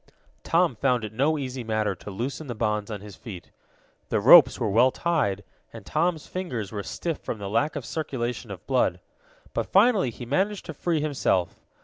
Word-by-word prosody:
Tom 170 -5 +2
found 125 0 +1
it 110 0 -6
no 145 +7 +2
easy 130 -3 -4
matter 110 -2 0
to 95 - -10
loosen 130 +9 -4
the 120 - -4
bonds 105 -1 -1
on 105 -3 -5
his 105 -2 -10
feet. 95 -5 -10 0.6
The - - +1
ropes 130 +6 +8
were 115 - 0
well 120 +5 +5
tied, 130 - -1 0.3
and 115 -4 -11
Tom's 160 +2 0
fingers 125 - -4
were 105 -2 -4
stiff 165 - -4
from - - -5
the 100 -1 -6
lack 130 +10 0
of 140 -5 -4
circulation 125 -6 -4
of - - -9
blood. - - +1 0.5
But - - -3
finally 200 - +4
he 120 +1 -8
managed 190 - 0
to 160 - -6
free 160 +1 -1
himself. 130 - 0
125 Hz, 190 wpm, -26 LUFS, 105-155 Hz, 0.6 s, ropes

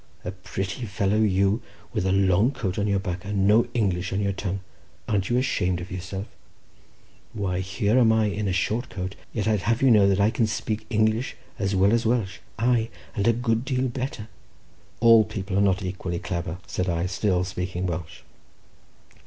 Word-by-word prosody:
A - - -2
pretty 95 +4 -5
fellow, 100 +1 +1
you, 100 +1 +2 0.3
with 95 - 0
a - - +2
long 95 +3 +4
coat 105 -9 -3
on 100 - +1
your 100 -1 +2
back, 90 -2 -3
and 100 -1 0
no 110 +4 +5
English 95 -6 0
on 95 - -1
your 100 -1 0
tongue; 95 0 -3 0.5
an't 100 -3 0
you 120 - +2
ashamed 95 -9 +1
of 90 +2 -8
yourself? 95 +2 -5 1.1
Why, 95 -4 -1
here 100 +6 +1
am 115 -3 +5
I 110 -1 +3
in 105 0 -1
a - - +1
short 110 +7 -1
coat, 95 0 -4 0.2
yet 110 -2 -2
I'd 105 -3 +2
have 115 +4 0
you 135 - +6
to - - +7
know 100 -2 +6
that 100 0 +2
I 105 +2 +4
can 115 -2 +1
speak 110 0 -3
English 110 +2 +1 0.2
as 100 -1 0
well 95 +3 +4
as 115 0 +2
Welsh, 110 -5 0 0.2
aye, 115 0 +2 0.3
and 100 -1 +1
a - - +7
good 115 -1 0
deal 130 -1 0
better." 125 -3 -4 0.7
"All 115 -1 +8
people 100 -2 -5
are 100 - +4
not 95 -1 +2
equally 90 -1 -3
clebber," 85 0 -4
said 90 0 -2
I, 85 0 0
still 90 0 +1
speaking 90 0 -3
Welsh. 85 -3 -4
100 Hz, 195 wpm, -25 LUFS, 95-110 Hz, 1.1 s, All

